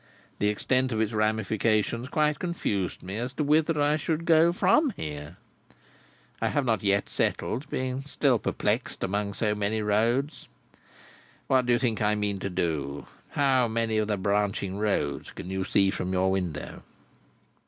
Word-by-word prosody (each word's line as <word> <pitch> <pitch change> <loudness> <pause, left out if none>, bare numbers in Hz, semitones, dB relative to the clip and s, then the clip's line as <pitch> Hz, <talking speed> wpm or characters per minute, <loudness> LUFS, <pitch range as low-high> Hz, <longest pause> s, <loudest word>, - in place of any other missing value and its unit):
The 105 - +2
extent 130 +5 +1
of 110 - -1
its 110 0 0
ramifications 110 +2 0
quite 150 +1 +1
confused 105 - -2
me 95 +3 -5
as 125 +3 -3
to 150 - 0
whither 155 +2 +2
I 145 +1 +3
should 160 +2 -2
go, 165 0 +5
from 195 - +3
here. 75 +2 -6 1.0
I - - +2
have 145 -3 0
not 110 -5 +1
yet 100 0 +1
settled, 135 +6 -2
being 130 0 -2
still 140 -3 +1
perplexed - - -1
among 100 +1 -2
so 105 -1 +1
many 105 +1 -1
roads. 115 +8 0 1.0
What 130 -2 +2
do 120 - +4
you - - +4
think 115 -3 -1
I 105 0 +2
mean 105 -2 -1
to 100 - -3
do? 80 -6 -2 0.2
How 130 -3 +3
many 110 -1 0
of 105 - 0
the 105 -1 0
branching 100 0 -1
roads 85 -10 -1
can 90 - -8
you 95 0 -1
see 95 0 +2
from 95 -2 -3
your 95 +1 +2
window?" 90 -6 -3
110 Hz, 165 wpm, -27 LUFS, 100-130 Hz, 1.0 s, go